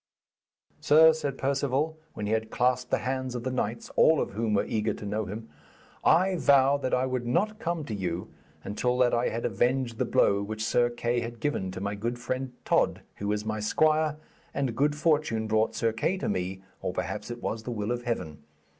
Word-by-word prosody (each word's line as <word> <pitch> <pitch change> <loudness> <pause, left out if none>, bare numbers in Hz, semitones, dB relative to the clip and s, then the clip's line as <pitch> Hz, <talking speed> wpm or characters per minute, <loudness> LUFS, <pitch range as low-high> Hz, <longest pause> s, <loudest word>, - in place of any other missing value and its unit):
'Sir,' 160 +2 +7
said 145 -4 -3
Perceval, 140 +3 0 0.2
when 105 - -4
he 105 - -2
had 110 0 -1
clasped 125 +1 +1
the - - +2
hands 130 -1 -2
of 120 - -4
the 130 - -2
knights, 115 -2 -3
all 160 -2 +5
of - - -1
whom 110 +1 0
were 100 - +2
eager 110 -1 -1
to - - -8
know 105 +1 -2
him, 110 +4 -7 0.6
'I 185 +3 +4
vowed 140 -1 +4
that 130 - -1
I 125 +1 +1
would 130 -2 -2
not 215 - 0
come 170 -6 -2
to 110 - -5
you 90 -3 -3 0.4
until 125 +5 -1
that 125 -1 +3
I 120 +1 +2
had 115 +1 -3
avenged 120 +2 0
the - - +2
blow 100 0 +3
which 110 +1 -3
Sir 120 +1 +3
Kay 120 0 -1
had 115 0 -6
given 145 -10 -1
to 95 0 -6
my 100 +1 -2
good 115 +4 -3
friend 130 +2 -3
Tod, - - +2 0.2
who 100 0 -2
is 105 0 -2
my 110 0 -2
squire, 155 +7 +2 0.4
and 135 -4 -1
good 145 +4 +2
fortune 150 -8 +1
brought 110 0 +1
Sir 115 -1 +1
Kay 170 +12 0
to - - -3
me, 95 +1 -2 0.2
or 90 - -2
perhaps 105 +5 -4
it 120 0 -7
was 110 - -2
the 115 - -7
will 105 0 -2
of 120 0 -1
Heaven. 110 -11 -3
120 Hz, 210 wpm, -28 LUFS, 110-135 Hz, 0.6 s, Sir